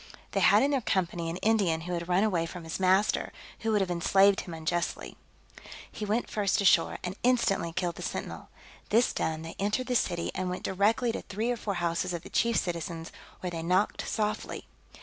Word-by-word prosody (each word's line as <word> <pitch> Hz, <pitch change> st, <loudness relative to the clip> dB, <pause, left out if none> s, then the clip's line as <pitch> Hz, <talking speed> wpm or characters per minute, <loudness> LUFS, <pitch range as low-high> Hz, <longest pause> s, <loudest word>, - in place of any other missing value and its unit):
They -, -, 0 dB
had -, -, +6 dB
in 280 Hz, -, +2 dB
their 275 Hz, -2 st, +1 dB
company 175 Hz, -5 st, -1 dB
an 165 Hz, -, -4 dB
Indian 200 Hz, -7 st, +2 dB
who 180 Hz, +2 st, -5 dB
had 170 Hz, -1 st, -3 dB
run 180 Hz, +3 st, +3 dB
away 175 Hz, -6 st, +1 dB
from 175 Hz, 0 st, -8 dB
his 160 Hz, +3 st, -5 dB
master, 190 Hz, +2 st, +2 dB, 0.3 s
who 225 Hz, -, -1 dB
would 210 Hz, -2 st, +3 dB
have 185 Hz, -2 st, -1 dB
enslaved 195 Hz, +3 st, +4 dB
him 175 Hz, -, -8 dB
unjustly. 165 Hz, +2 st, -2 dB, 0.8 s
He 210 Hz, -, -5 dB
went 215 Hz, +4 st, 0 dB
first 205 Hz, -2 st, 0 dB
ashore, 185 Hz, -4 st, +4 dB
and 180 Hz, +1 st, -4 dB
instantly 235 Hz, -9 st, +2 dB
killed 175 Hz, 0 st, -2 dB
the -, -, -7 dB
sentinel: -, -, -5 dB, 0.4 s
this 235 Hz, +3 st, +3 dB
done, 160 Hz, 0 st, -2 dB
they 165 Hz, -, -7 dB
entered 210 Hz, +6 st, 0 dB
the 250 Hz, 0 st, -1 dB
city, 170 Hz, -7 st, 0 dB
and 185 Hz, -1 st, -2 dB
went 180 Hz, -, -4 dB
directly 220 Hz, +5 st, +2 dB
to -, -, -4 dB
three 220 Hz, +5 st, -2 dB
or -, -, 0 dB
four 210 Hz, -3 st, -3 dB
houses 175 Hz, +1 st, -1 dB
of 170 Hz, -, -6 dB
the -, -, -11 dB
chief 235 Hz, -1 st, +2 dB
citizens, 170 Hz, -1 st, -3 dB, 0.3 s
where 180 Hz, -, -3 dB
they 165 Hz, -1 st, -4 dB
knocked 185 Hz, +5 st, +1 dB
softly. 215 Hz, -1 st, -2 dB
185 Hz, 205 wpm, -29 LUFS, 170-215 Hz, 0.8 s, had